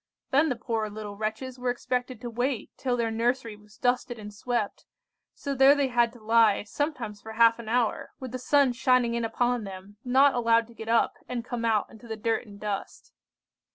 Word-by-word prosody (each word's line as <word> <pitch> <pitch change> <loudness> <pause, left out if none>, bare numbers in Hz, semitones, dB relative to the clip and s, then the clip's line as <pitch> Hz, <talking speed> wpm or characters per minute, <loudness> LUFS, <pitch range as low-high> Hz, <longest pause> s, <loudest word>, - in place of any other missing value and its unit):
Then 295 +3 +4
the 250 - 0
poor 230 -2 -2
little 210 -1 -7
wretches 220 +5 -4
were 250 0 -1
expected 250 0 -2
to 240 - -5
wait 245 0 -2
till 250 -2 -1
their 230 -1 0
nursery 235 0 0
was 210 +1 -20
dusted 245 -1 0
and 210 -1 -9
swept; 225 -1 -3 0.5
so 280 - -3
there 270 +1 +6
they 280 -2 +1
had 240 -2 +3
to 240 - -14
lie, 220 -2 +4
sometimes 230 -3 -3
for 220 - -8
half 230 +1 +5
an 225 -2 -7
hour, 235 -1 0
with 260 -3 -6
the 255 - -4
sun 275 0 +3
shining 245 0 +3
in 235 0 -1
upon 240 +1 0
them, 195 +1 -9
not 265 +3 +5
allowed 230 -1 +3
to - - -14
get 225 -1 -8
up 230 0 +2
and 240 -2 -3
come 240 -1 -3
out 220 -3 +2
into 225 +2 -14
the 220 -1 -5
dirt 225 +2 -1
and 200 -1 -12
dust! 205 -2 -5
235 Hz, 205 wpm, -27 LUFS, 220-250 Hz, 0.5 s, there